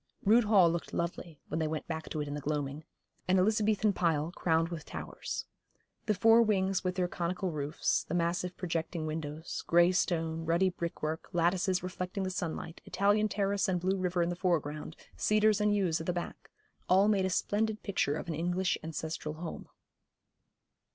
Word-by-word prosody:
Rood 225 Hz, +3 st, +5 dB
Hall 200 Hz, -5 st, +6 dB
looked 170 Hz, 0 st, -4 dB
lovely 170 Hz, -2 st, -3 dB
when 160 Hz, -, -2 dB
they 160 Hz, -, +1 dB
went 155 Hz, 0 st, -3 dB
back 160 Hz, -1 st, -4 dB
to 155 Hz, -, -2 dB
it 145 Hz, -, -3 dB
in 145 Hz, -, -4 dB
the 145 Hz, -, -4 dB
gloaming, 145 Hz, +1 st, -3 dB, 0.4 s
an 185 Hz, +1 st, +4 dB
Elizabethan 210 Hz, +1 st, +2 dB
pile 165 Hz, -3 st, +1 dB
crowned 165 Hz, -2 st, +1 dB
with 165 Hz, -3 st, -6 dB
towers. -, -, -6 dB, 0.6 s
The 215 Hz, -, +2 dB
four 225 Hz, +4 st, +6 dB
wings 195 Hz, -4 st, +1 dB
with 185 Hz, -1 st, -1 dB
their 180 Hz, -1 st, +1 dB
conical 180 Hz, +1 st, -2 dB
roofs, 150 Hz, -1 st, 0 dB
the -, -, -4 dB
massive 175 Hz, +1 st, -1 dB
projecting 165 Hz, -2 st, -2 dB
windows, 155 Hz, 0 st, -4 dB
grey 175 Hz, +1 st, +5 dB
stone, 165 Hz, -3 st, 0 dB
ruddy 170 Hz, +3 st, +2 dB
brickwork, 165 Hz, -2 st, -4 dB
lattices 180 Hz, +2 st, +1 dB
reflecting 185 Hz, +1 st, -4 dB
the 185 Hz, -, -2 dB
sunlight, 165 Hz, -2 st, -4 dB
Italian 205 Hz, +2 st, +2 dB
terrace 200 Hz, +1 st, 0 dB
and 185 Hz, -2 st, +1 dB
blue 185 Hz, +2 st, +1 dB
river 180 Hz, -1 st, +1 dB
in 170 Hz, -, 0 dB
the 175 Hz, -, -2 dB
foreground, 155 Hz, -4 st, -1 dB, 0.2 s
cedars 215 Hz, 0 st, +3 dB
and 210 Hz, 0 st, +3 dB
yews 180 Hz, -5 st, +1 dB
at 160 Hz, -, -6 dB
the 180 Hz, -, +1 dB
back, 175 Hz, 0 st, -6 dB, 0.4 s
all 190 Hz, +3 st, +5 dB
made 200 Hz, -3 st, +3 dB
a -, -, -2 dB
splendid 215 Hz, +3 st, 0 dB
picture 165 Hz, -8 st, 0 dB
of 160 Hz, -, -5 dB
an 165 Hz, -, -2 dB
English 175 Hz, +3 st, 0 dB
ancestral 160 Hz, -1 st, -4 dB
home. 165 Hz, +1 st, -7 dB
175 Hz, 180 wpm, -31 LUFS, 160-190 Hz, 0.6 s, Hall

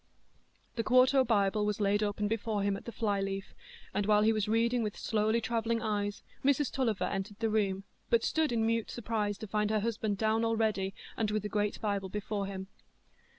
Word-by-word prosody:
The 230 Hz, -, +1 dB
quarto 255 Hz, +2 st, +5 dB
Bible 210 Hz, -3 st, +2 dB
was 210 Hz, 0 st, -1 dB
laid 205 Hz, 0 st, +2 dB
open 205 Hz, 0 st, 0 dB
before 220 Hz, -1 st, -1 dB
him 200 Hz, 0 st, +1 dB
at 195 Hz, -, -9 dB
the 235 Hz, -, -5 dB
fly 205 Hz, -4 st, 0 dB
leaf, 195 Hz, 0 st, -4 dB, 0.4 s
and 205 Hz, 0 st, 0 dB
while 210 Hz, 0 st, +5 dB
he 220 Hz, +1 st, +4 dB
was 215 Hz, -1 st, 0 dB
reading 235 Hz, +2 st, +2 dB
with 210 Hz, -2 st, -3 dB
slowly 220 Hz, +1 st, +1 dB
travelling 230 Hz, 0 st, 0 dB
eyes 205 Hz, -2 st, -2 dB, 0.2 s
Mrs 280 Hz, 0 st, +2 dB
Tulliver 225 Hz, -8 st, 0 dB
entered 200 Hz, +1 st, -3 dB
the 225 Hz, -1 st, 0 dB
room, 195 Hz, -3 st, +1 dB, 0.3 s
but 235 Hz, -1 st, +3 dB
stood 315 Hz, -3 st, +1 dB
in 225 Hz, -2 st, +1 dB
mute 230 Hz, 0 st, 0 dB
surprise 215 Hz, -3 st, -2 dB
to 220 Hz, -, -7 dB
find 210 Hz, +1 st, 0 dB
her 215 Hz, -1 st, +1 dB
husband 220 Hz, -2 st, -1 dB
down 220 Hz, +2 st, +1 dB
already, 220 Hz, -4 st, 0 dB, 0.2 s
and 220 Hz, -2 st, 0 dB
with 210 Hz, -1 st, -1 dB
the 210 Hz, -, -3 dB
great 205 Hz, 0 st, -1 dB
Bible 200 Hz, -3 st, -1 dB
before 205 Hz, 0 st, -3 dB
him. 190 Hz, -1 st, -5 dB
215 Hz, 195 wpm, -31 LUFS, 205-225 Hz, 0.4 s, quarto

